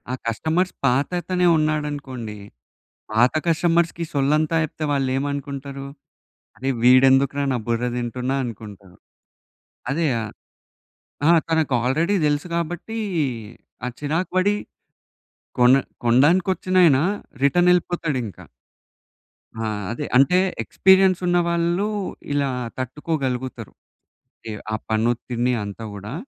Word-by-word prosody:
ఆ - - 0
కస్టమర్స్ 160 +10 0
పాతతనే 175 +7 +1
ఉన్నాడనుకోండి. 145 -8 -2 0.7
పాత 120 +3 +3
కస్టమర్స్‌కి 170 0 +1
సొల్లంతా 150 +3 +1
చెప్తే 155 +1 -5
వాళ్ళేమనుకుంటారు. 140 0 -2 0.7
"అరే 135 +1 -2
వీడెందుకురా 135 +2 +5
నా - - 0
బుర్ర 115 +1 0
తింటున్నా" 125 +2 -2
అనుకుంటారు. 100 -5 -9 1.0
అదే 165 +3 0 1.2
ఆ! - - +8 0.2
తనకు 160 -4 +1
ఆల్రెడీ 160 +10 +1
తెలుసు 145 +3 0
కాబట్టి, 175 +6 -4 0.9
ఆ - - -1
చిరాకు 155 +5 -1
పడి 205 +2 +3 1.0
కొన 125 +1 +7 0.3
కొనడానికి 145 +11 +4
వచ్చినయన 180 -6 +4 0.5
రిటర్న్ 175 +5 +4
ఎళ్ళిపోతాడు 170 -5 -1
ఇంక. 100 - -9 1.2
ఆ! 110 -1 -2 0.2
అదే. 145 +5 -4
అంటే 140 +7 +5 0.3
ఎక్స్పీరియన్స్ 190 -1 +4
ఉన్నవాళ్ళు, 175 +2 +1 0.5
ఇలా 140 -1 +1 0.3
తట్టుకోగలుగుతారు. 130 -3 -3 0.8
యాహ్! 105 -2 -6
ఆ - - +1
పని 110 +1 +1
ఒత్తిడిని 120 +1 -2
అంతా 100 +2 -7
గూడా. 105 +4 -7
140 Hz, 100 wpm, -22 LUFS, 125-170 Hz, 1.2 s, ఆ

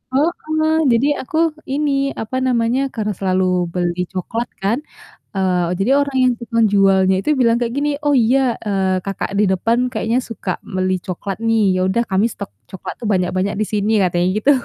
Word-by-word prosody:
heeh, 315 +1 +1 0.2
jadi 235 +5 +3 0.2
aku 315 - -3 0.3
ini, 285 +2 0 0.3
apa 240 +4 -4
namanya, 240 +1 +1
karena 210 -1 -1
selalu 185 -1 +1 0.3
beli 175 -1 -1
coklat 225 +6 -3 0.2
kan, 225 +7 +1 0.6
eee, 180 -2 +1
jadi 205 +7 +1
orang 280 -2 -3
yang 250 - +4
tukang 230 -1 +1
jualnya 190 -1 +4
itu 300 - -1
bilang 230 -1 +4
kayak 235 0 -1
gini, 295 +1 +1
"Oh 290 - +1
iya," 245 +1 +2
eee, 190 -2 +1
"kakak 195 0 -3
di 210 - +4
depan 225 +6 +1
kayaknya 225 +2 0
suka 230 -6 -5 0.2
beli 185 0 0
coklat 190 +2 -4
nih, 220 -5 +2
ya - - 0
udah 235 +5 +1
kami 195 +4 +3
stok - - -7 0.2
coklat 190 - -7
tuh 230 - -4
banyak-banyak 185 +2 0
di - - +2
sini," 210 +1 +1
katanya 175 0 +1 0.2
gitu, 285 - +4
215 Hz, 175 wpm, -19 LUFS, 190-245 Hz, 0.6 s, yang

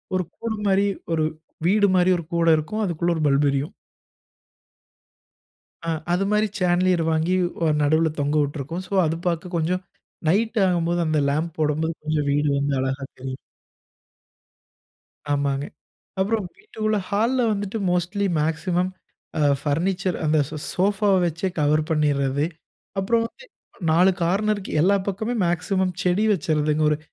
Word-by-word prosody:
ஒரு 185 - +1
கூட 230 -1 -3
மாரி 195 +1 +3 0.3
ஒரு 160 -1 +1 0.4
வீடு 205 +2 +4
மாரி 180 0 +4
ஒரு 170 - -5
கூட 170 0 +2
இருக்கும். 185 +9 -3
அதுக்குள்ள 170 -1 0
ஒரு 160 - -2
பல்ப் 140 +1 +3
எரியும். 140 +5 -2 2.1
ஆ. - - 0 0.2
அது 180 +2 +1
மாரி 210 +1 +3
சேன்லியர் 180 -1 +2
வாங்கி 160 +3 +1 0.3
வ 165 - +3
நடுவுல 155 +2 +3
தொங்க 145 +1 0
விட்டிருக்கோம். 145 +4 -3
சோ 200 - -7
அது 160 +1 0
பாக்க 175 +1 -2
கொஞ்சம் 175 +3 0 0.5
நைட் 220 +5 +1
ஆகும்போது 175 -1 +1
அந்த 155 -1 +2
லாம்ப் 155 +3 -1
போடம்போது 155 +2 0
கொஞ்சம் 155 -2 0
வீடு 145 +1 +2
வந்து 140 0 0
அழகா 135 +1 -2 0.2
தெரியும். 130 0 -5 2.0
ஆமாங்க. 140 0 0 0.6
அப்புறம் 205 0 0
வீட்டுக்குள்ள, 215 +1 -2
ஹால்ல 235 +5 +2
வந்துட்டு 205 +1 -3
மோஸ்ட்லி 180 +3 0
மேக்ஸிமம் 175 +4 0 0.5
அ - - +1 0.2
பர்னிச்சர் 180 +5 0
அந்த 155 0 +3
ஸோ 155 - -6 0.2
சோஃபாவை 200 +1 +2
வச்சே 170 +3 -2
கவர் 150 +1 +3
பண்ணிர்றது. 145 -2 +1 0.5
அப்புறம் 230 +4 +2
வந்து, 470 - -16 0.3
அ - - -20
4 180 +4 +5
கார்னருக்கு 200 +3 0
எல்லா 195 +5 +4
பக்கமே 220 +5 -2
மேக்ஸிமம் 185 +2 0
செடி 185 +3 +2
வச்சர்றதுங்க. 155 -3 0
ஒரு 150 - +1
170 Hz, 135 wpm, -23 LUFS, 150-195 Hz, 2.1 s, 4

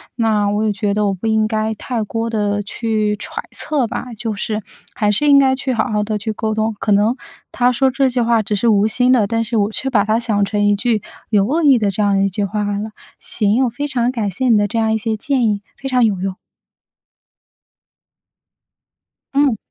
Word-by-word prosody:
那 215 -3 +1
我 210 +2 0
也 215 - +1
觉 205 0 -1
得 210 0 +1
我 200 - 0
不 190 +3 -7
应 220 -1 +2
该 220 0 -1
太 230 +1 -3
多 225 +2 -3
地 205 -2 -1
去 215 0 -1
揣 - - -6
测 280 -6 -1
吧。 245 +2 -5
就 225 -1 -4
是， 210 +1 -3 0.3
还 210 - 0
是 210 +8 +1
应 280 -1 +7
该 265 -1 +3
去 265 0 -2
好 225 - 0
好 210 -1 0
地 215 0 -2
去 220 +1 -4
沟 220 0 -2
通。 220 0 -1
可 210 - -1
能 210 +4 +3 0.4
他 245 0 +3
说 265 +2 +2
这 265 +1 +1
句 250 0 -2
话 230 -1 +2
只 210 0 -2
是 235 - 0
无 210 -2 +4
心 250 +3 +2
的， 230 -5 +3
但 230 +3 -1
是 235 +1 -3
我 210 -1 +1
却 265 +4 -3
把 215 -6 +3
它 220 +2 +1
想 215 -4 0
成 205 +1 0
一 205 - +3
句 220 0 0 0.3
有 205 -3 +3
恶 320 +6 0
意 280 -4 +6
的 210 -2 +1
这 200 +2 -1
样 200 -1 +2
的 195 - +2
一 - - +2
句 195 +2 -2
话 210 +1 -2
来 205 0 -2
了。 215 +2 -4 0.3
行， 215 +3 0
我 250 - +1
非 285 +5 -4
常 250 -3 0
感 225 -5 -2
谢 250 +7 -1
你 225 - +5
的 205 0 +2
这 225 +3 -4
样 220 -1 +1
一 - - +1
些 220 0 -2
建 255 +3 0
议， 205 -1 -1 0.2
非 270 - -6
常 255 -2 +2
有 205 -5 +1
用。 190 0 -3 3.0
嗯。 275 -5 +2
220 Hz, 250 characters per minute, -18 LUFS, 205-245 Hz, 3.0 s, 应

